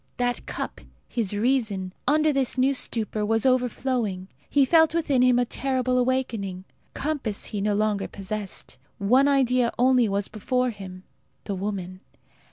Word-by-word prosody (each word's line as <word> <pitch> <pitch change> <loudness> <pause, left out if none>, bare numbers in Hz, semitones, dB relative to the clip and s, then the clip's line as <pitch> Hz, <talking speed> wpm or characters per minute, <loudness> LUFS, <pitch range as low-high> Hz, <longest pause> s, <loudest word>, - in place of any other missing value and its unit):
That 245 0 -1
cup, - - -5 0.3
his 225 -6 -1
reason, 210 -4 0
under 305 +2 +3
this 270 -2 0
new 265 +2 +3
stupor, 220 -4 -1
was 225 +2 +1
overflowing. 250 -6 0 0.2
He 280 -2 +4
felt 320 +2 +4
within 290 -6 +2
him 250 -1 +5
a 245 - +2
terrible 255 0 0
awakening. 230 -8 -1 0.3
Compass 275 -8 -2
he 205 - -4
no 205 0 +1
longer 210 -1 0
possessed. 200 -7 -6 0.2
One 250 +8 +4
idea 255 -3 +3
only 250 -2 +4
was 200 0 -1
before 250 +4 -1
him 185 -3 -10 0.4
the 200 - -4
woman. 185 -2 -4
240 Hz, 145 wpm, -25 LUFS, 205-260 Hz, 0.4 s, him